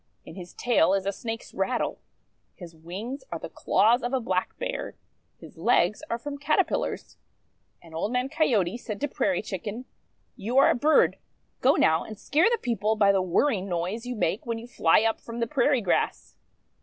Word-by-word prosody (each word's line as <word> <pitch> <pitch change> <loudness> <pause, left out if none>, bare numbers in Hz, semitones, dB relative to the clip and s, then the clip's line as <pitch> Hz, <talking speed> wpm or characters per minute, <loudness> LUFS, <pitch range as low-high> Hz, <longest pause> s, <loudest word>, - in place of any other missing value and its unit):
In - - -10
his 180 -2 -10
tail 195 -7 +3
is 195 -1 -2
a 200 - +1
Snake's 225 +3 -6
rattle. - - -1 0.6
His 170 -3 -11
wings 195 - -7
are - - -2
the - - -8
claws 235 +4 +3
of 245 +2 -3
a 265 - +2
Black 185 -6 -2
Bear. - - -4 0.4
His - - -14
legs - - +2
are 230 - -1
from 285 +4 -7
Caterpillars. 290 - -1 0.7
And 165 -1 -15
Old 165 +7 -2
Man 250 +1 0
Coyote 240 - +1
said 215 -4 -6
to 290 - +1
Prairie 285 -2 -1
Chicken: 210 +6 -5 0.2
— - - -45
'You 235 +3 -3
are 275 - +7
a - - +1
bird. 300 +5 +3 0.4
Go, 265 +3 +4
now, 160 +1 +3
and 215 - -9
scare 320 - +2
the 475 - +2
people 220 - -1
by 200 -2 +4
the 195 -1 +2
whirring 190 +2 +1
noise 185 +7 -3
you 250 - -3
make 205 0 -1
when 230 -1 -3
you 225 - -8
fly 215 -5 +3
up 225 0 0
from 230 0 -7
the 230 - +1
prairie 260 0 +2
grass." 190 - -1
225 Hz, 195 wpm, -26 LUFS, 190-255 Hz, 0.7 s, are